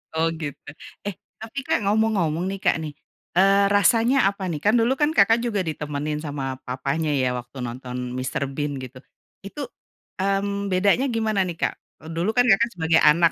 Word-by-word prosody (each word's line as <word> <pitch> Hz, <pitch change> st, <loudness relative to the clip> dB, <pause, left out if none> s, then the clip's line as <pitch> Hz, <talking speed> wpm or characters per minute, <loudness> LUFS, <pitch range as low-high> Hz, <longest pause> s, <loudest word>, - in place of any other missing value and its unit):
Oh 160 Hz, +1 st, +2 dB
gitu, 145 Hz, -3 st, -5 dB, 0.5 s
eh 205 Hz, -, -3 dB, 0.2 s
tapi 225 Hz, +5 st, -6 dB
Kak 320 Hz, -, +2 dB
ngomong-ngomong 200 Hz, -7 st, +1 dB
nih 195 Hz, -, -5 dB
Kak -, -, +3 dB
nih, 155 Hz, -, -5 dB, 0.5 s
eee, 195 Hz, +1 st, +5 dB
rasanya 230 Hz, +5 st, +4 dB
apa 200 Hz, -1 st, -7 dB
nih, 150 Hz, -, -3 dB
kan 210 Hz, -, +4 dB
dulu 235 Hz, +3 st, +3 dB
kan 295 Hz, -, +4 dB
Kakak 225 Hz, +1 st, +5 dB
juga 205 Hz, -5 st, 0 dB
ditemenin 150 Hz, -1 st, -3 dB
sama 145 Hz, -2 st, -4 dB, 0.2 s
papanya 140 Hz, +5 st, -2 dB
ya 130 Hz, -, +2 dB
waktu 125 Hz, +3 st, -13 dB
nonton 125 Hz, +1 st, -7 dB, 0.2 s
Mr. 130 Hz, +2 st, -2 dB
Bean 145 Hz, -1 st, -2 dB
gitu, 130 Hz, 0 st, -9 dB, 0.5 s
itu, 245 Hz, +9 st, -7 dB, 0.6 s
mmm, 200 Hz, +1 st, 0 dB
bedanya 200 Hz, +7 st, +3 dB
gimana 220 Hz, -2 st, 0 dB
nih 175 Hz, -, -4 dB
Kak, -, -, +1 dB, 0.4 s
dulu 170 Hz, +5 st, 0 dB
kan 245 Hz, -, +5 dB
Kakak 230 Hz, +4 st, +4 dB
sebagai 160 Hz, -1 st, +3 dB
anak 170 Hz, +2 st, +4 dB
185 Hz, 170 wpm, -23 LUFS, 150-210 Hz, 0.6 s, eee